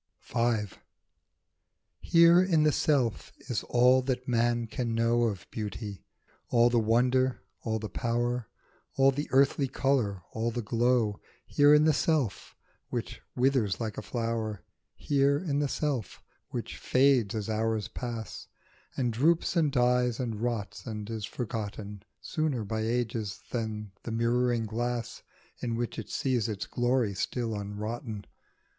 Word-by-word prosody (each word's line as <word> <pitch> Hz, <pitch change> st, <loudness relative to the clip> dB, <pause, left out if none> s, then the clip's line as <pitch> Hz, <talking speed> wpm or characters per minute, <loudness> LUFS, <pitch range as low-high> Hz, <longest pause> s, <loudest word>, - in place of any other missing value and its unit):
V. 115 Hz, -3 st, 0 dB, 1.3 s
HERE 170 Hz, +1 st, +6 dB
in 165 Hz, -5 st, +3 dB
the 155 Hz, -, +4 dB
self 130 Hz, -7 st, +1 dB
is 120 Hz, -7 st, -3 dB
all 125 Hz, +1 st, +5 dB
that 130 Hz, -1 st, -2 dB
man 120 Hz, -1 st, +1 dB
can 115 Hz, +1 st, -3 dB
know 115 Hz, +1 st, +3 dB
Of 100 Hz, -5 st, -3 dB
Beauty, 105 Hz, -2 st, -5 dB, 0.5 s
all 120 Hz, 0 st, +4 dB
the 120 Hz, -, +4 dB
wonder, 125 Hz, +3 st, +2 dB, 0.2 s
all 110 Hz, -1 st, -1 dB
the 110 Hz, 0 st, -4 dB
power, 120 Hz, +1 st, -1 dB, 0.5 s
All 135 Hz, 0 st, +5 dB
the 145 Hz, +3 st, -4 dB
unearthly 135 Hz, +1 st, +3 dB
colour, 120 Hz, -9 st, 0 dB
all 115 Hz, +1 st, -1 dB
the 120 Hz, 0 st, -3 dB
glow, 115 Hz, -1 st, +1 dB, 0.2 s
Here 145 Hz, 0 st, +4 dB
in 150 Hz, -, +5 dB
the 155 Hz, -, +5 dB
self 145 Hz, -8 st, 0 dB, 0.3 s
which -, -, -4 dB
withers 125 Hz, -6 st, +2 dB
like 110 Hz, -2 st, -3 dB
a -, -, -4 dB
flower; 115 Hz, -4 st, -3 dB, 0.3 s
Here 140 Hz, 0 st, +2 dB
in 145 Hz, -3 st, -1 dB
the 145 Hz, -, +1 dB
self 135 Hz, -7 st, -3 dB, 0.3 s
which -, -, -5 dB
fades 130 Hz, -5 st, +3 dB
as 105 Hz, -2 st, -3 dB
hours 110 Hz, -1 st, 0 dB
pass, 115 Hz, -2 st, -6 dB, 0.5 s
And 120 Hz, -3 st, 0 dB
droops 165 Hz, +9 st, +2 dB
and 155 Hz, -4 st, +3 dB
dies 125 Hz, -1 st, +2 dB
and 115 Hz, -4 st, -3 dB
rots 120 Hz, -2 st, -3 dB
and 105 Hz, -2 st, -5 dB
is 110 Hz, -2 st, -3 dB
forgotten 105 Hz, -3 st, -5 dB, 0.2 s
Sooner, 155 Hz, -8 st, -1 dB
by 110 Hz, +2 st, -3 dB
ages, 115 Hz, -3 st, -2 dB
than 110 Hz, -3 st, -3 dB
the 115 Hz, -, -6 dB
mirroring 120 Hz, 0 st, +1 dB
glass 120 Hz, +2 st, -3 dB, 0.4 s
In 120 Hz, -2 st, -2 dB
which 120 Hz, 0 st, -3 dB
it -, -, -7 dB
sees 125 Hz, -4 st, 0 dB
its 105 Hz, -3 st, -3 dB
glory 120 Hz, -3 st, +1 dB
still 115 Hz, +4 st, -2 dB
unrotten. 105 Hz, +2 st, -5 dB
120 Hz, 140 wpm, -29 LUFS, 110-130 Hz, 1.3 s, HERE